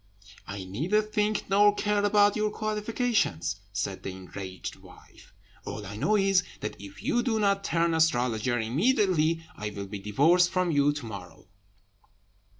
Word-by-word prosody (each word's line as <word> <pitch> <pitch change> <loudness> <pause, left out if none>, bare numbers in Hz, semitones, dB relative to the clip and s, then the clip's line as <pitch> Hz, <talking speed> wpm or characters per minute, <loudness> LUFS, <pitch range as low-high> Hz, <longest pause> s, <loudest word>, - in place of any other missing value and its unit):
"I 100 -1 -5
neither 145 - 0
think 215 0 -1
nor 205 +1 +5
care 205 -1 0
about 205 0 +4
your 215 0 +1
qualifications," 215 - -1
said 100 -1 -3
the - - -5
enraged 95 0 -7
wife; - - -17 0.3
"all 105 - -6
I 100 +1 -7
know 210 - +2
is, 195 -2 +3 0.2
that 105 - -4
if 100 -1 -11
you 240 - +1
do 240 -3 0
not 200 -1 +2
turn 170 -2 +1
astrologer 125 -6 +1
immediately 165 - +2
I 105 0 -4
will 100 -1 -6
be 100 +1 -7
divorced 160 - +3
from 185 -2 0
you 145 -1 +3
to 145 -4 -6
morrow." 95 -4 -10
165 Hz, 150 wpm, -28 LUFS, -, 0.3 s, nor